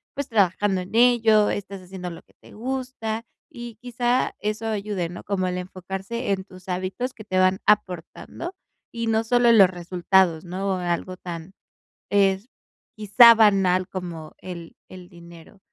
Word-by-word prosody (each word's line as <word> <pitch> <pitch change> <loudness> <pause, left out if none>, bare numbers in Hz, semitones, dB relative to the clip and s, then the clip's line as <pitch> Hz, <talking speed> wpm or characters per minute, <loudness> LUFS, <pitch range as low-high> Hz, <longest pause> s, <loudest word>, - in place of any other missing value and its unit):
pues, 285 -1 -3
trabajando 200 -2 +1
en 180 - -10
ello, 225 -3 +5
estás 195 -1 -5
haciendo 180 0 -7
lo 170 - -10
que - - -29
te - - -16
gusta, 245 -2 -4 0.3
y, 240 -4 -9
quizá, 245 +1 0
eso 215 +1 -3
ayude, 205 -5 -2
¿no? 175 - -9
Como 190 -2 -1
el 180 0 -2
enfocarse 190 +5 -5
en 190 -1 -1
tus 185 -1 -16
hábitos 185 +8 -3
que 215 - -11
te 185 -3 -1
van 185 +1 +3
aportando, 200 - -1 0.4
y 230 0 -4
no 220 0 +1
solo 245 +1 +3
en 230 - +6
los 190 -2 +8
resultados, 175 -1 +1
¿no?, 190 +2 -3
algo 180 +1 -3
tan 170 0 -8 0.6
es, 195 +1 +2 0.5
quizá, 225 +2 +7
banal 195 -4 +3
como 170 -4 -7
el 170 -3 -9
el 180 -1 -12
dinero. 170 +2 -15
195 Hz, 155 wpm, -24 LUFS, 180-225 Hz, 0.6 s, los